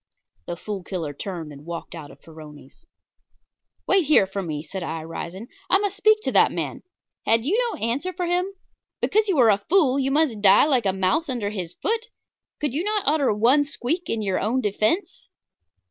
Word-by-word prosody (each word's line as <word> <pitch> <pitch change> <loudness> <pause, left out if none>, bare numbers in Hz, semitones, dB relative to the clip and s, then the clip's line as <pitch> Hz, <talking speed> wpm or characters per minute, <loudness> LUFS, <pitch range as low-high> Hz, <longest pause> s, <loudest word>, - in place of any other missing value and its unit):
The 170 - -4
Fool 200 0 -6
Killer 170 -6 -4
turned 165 -1 -6
and 140 0 -12
walked 170 +1 -7
out 160 -4 -9
of - - -15
Farroni's. 155 - -14 1.0
"Wait 385 -4 +3
here 300 -10 +5
for 195 +1 -4
me," 155 -4 -4
said 190 +4 -6
I, 160 -2 -4
rising; 170 +6 -7 0.2
"I 385 - +6
must 400 -1 -2
speak 430 +1 +3
to - - -1
that - - +5
man. - - -4 0.5
Had 225 +1 +3
you 350 +9 +1
no - - -5
answer 255 +11 -1
for 360 -1 -3
him? 355 +2 0 0.5
Because 435 +1 +1
you 380 -6 +1
are 235 -4 +6
a 200 0 0
fool 305 -8 +4
must 300 0 +2
you 215 -2 -9
die 200 +5 +6
like 255 -8 +2
a - - +3
mouse 195 - 0
under 225 -6 -2
his 180 -5 -5
foot? 455 +2 -1 0.5
Could 295 -4 -2
you 310 +5 -1
not 420 0 0
utter 290 -3 +2
one 240 +8 +4
squeak 305 +4 -3
in 220 -1 -1
your 190 -2 0
own 230 +6 0
defence? 215 - -1
230 Hz, 195 wpm, -23 LUFS, -, 1.0 s, I